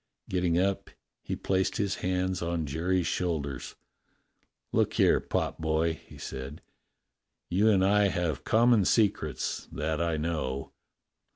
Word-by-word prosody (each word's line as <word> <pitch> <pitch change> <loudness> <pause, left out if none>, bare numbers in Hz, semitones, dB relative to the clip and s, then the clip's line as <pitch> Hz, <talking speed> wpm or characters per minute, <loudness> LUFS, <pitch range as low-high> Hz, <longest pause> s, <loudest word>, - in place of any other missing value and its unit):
Getting 90 -2 +1
up, 95 +1 0 0.3
he - - -4
placed 95 -1 0
his 100 -1 -1
hands 90 0 -1
on 85 -1 -1
Jerry's 85 +5 0
shoulders. 75 -7 -2 1.0
"Look - - +2
here, - - +4
potboy," 80 +1 -1
he - - -15
said, 65 +3 -7 0.9
"you 100 +5 +4
and 95 -3 +4
I 100 +1 +4
have 85 -6 -1
com 120 +2 +4
mon 110 -4 +5
secrets 90 - 0
that 80 +1 -2
I 85 -2 0
know. 75 -4 -3
85 Hz, 125 wpm, -29 LUFS, 80-95 Hz, 1.0 s, mon